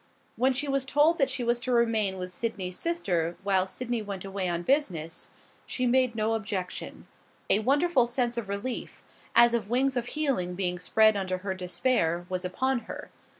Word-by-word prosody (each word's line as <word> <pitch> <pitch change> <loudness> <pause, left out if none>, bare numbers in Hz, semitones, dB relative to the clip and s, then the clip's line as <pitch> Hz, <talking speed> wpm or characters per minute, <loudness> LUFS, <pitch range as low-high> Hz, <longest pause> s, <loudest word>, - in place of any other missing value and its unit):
When 255 +3 +3
she 265 +3 -1
was 275 -1 +1
told 295 +5 +3
that 275 - +3
she 250 - -2
was 240 0 +1
to 255 +1 -3
remain 225 -5 +2
with 180 0 -5
Sydney's 190 -3 -3
sister 180 - -1
while 190 -2 +2
Sydney 240 +2 -3
went 200 -2 -6
away 195 -2 -2
on 170 0 -2
business, 175 - -1 0.4
she 255 - -1
made 250 -1 +3
no 220 0 +1
objection. 200 -4 -4 0.5
A 205 - +7
wonderful 275 +2 +3
sense 240 0 0
of 230 -4 -4
relief, 200 +6 -4 0.3
as 235 0 +7
of 220 -4 -1
wings 260 +2 +2
of 245 -1 -1
healing 245 -13 -1
being 180 -1 -1
spread 215 +4 +4
under 185 -2 -1
her 190 - 0
despair, 180 -2 0
was 185 0 -2
upon 260 +8 0
her. - - -7
225 Hz, 180 wpm, -28 LUFS, 185-255 Hz, 0.5 s, A